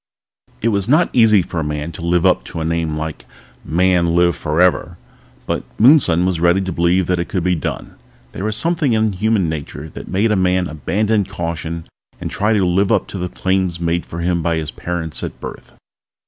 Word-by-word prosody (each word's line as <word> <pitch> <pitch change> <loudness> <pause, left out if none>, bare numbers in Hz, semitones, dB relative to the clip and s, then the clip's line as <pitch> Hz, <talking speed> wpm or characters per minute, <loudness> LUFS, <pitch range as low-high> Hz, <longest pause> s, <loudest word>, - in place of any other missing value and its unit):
It 115 - +3
was 100 -1 0
not 155 +6 +4
easy 110 -5 +5
for 85 - -4
a - - -1
man 75 +2 -3
to 85 - -9
live 85 0 +1
up - - +3
to - - -6
a 80 - -2
name 80 -1 -1
like 80 0 -5 0.4
Man, 90 +1 +2
Live 85 0 +3
Forever! 85 +2 +1 0.5
But - - -2 0.2
Moonson 110 - +5
was 90 -3 0
ready 85 +2 +3
to 95 -1 -3
believe 85 +2 +2
that 90 0 0
it 85 - -3
could 90 - -1
be 90 0 +2
done. 80 - -4 0.4
There 95 - -6
was 110 0 -1
something 165 -6 +1
in 110 -1 +1
human 105 -1 +1
nature 75 0 -5
which - - -8
made 105 +4 +1
a - - +3
man 90 -1 +1
abandon 100 +7 0
caution 85 -3 -5 0.3
and - - -5
try 105 +2 +1
to 100 -3 +2
live 95 +3 +2
up 110 - +2
to 95 - -6
the 90 0 -3
claims 95 -2 -1
made 85 0 0
for 85 - -7
him 85 0 0
by 85 0 0
his 80 -2 -3
parents 85 -3 -4
at - - -6
birth. - - -9
90 Hz, 205 wpm, -18 LUFS, 85-100 Hz, 0.5 s, easy